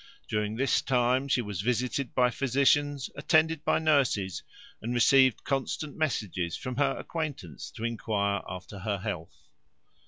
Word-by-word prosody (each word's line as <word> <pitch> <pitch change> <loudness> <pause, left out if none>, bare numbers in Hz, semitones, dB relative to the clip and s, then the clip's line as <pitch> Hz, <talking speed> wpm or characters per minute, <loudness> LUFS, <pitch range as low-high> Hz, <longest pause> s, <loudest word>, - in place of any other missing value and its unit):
During 105 0 -1
this 135 +4 +2
time 125 +1 +2
she 125 -2 +1
was 100 -4 -4
visited 125 +3 -1
by 125 -1 +4
physicians, 140 +2 +1
attended 155 +2 +2
by - - +2
nurses, 130 - +1 0.4
and 120 +2 -3
received 130 +1 +5
constant 140 +2 -2
messages 100 - -1
from 130 -2 -5
her 140 -1 +2
acquaintance 145 - -5
to 110 - -7
enquire 105 -3 -1
after 90 +2 -8
her 100 +1 -2
health. 90 -5 -6
125 Hz, 135 wpm, -28 LUFS, 105-140 Hz, 0.4 s, received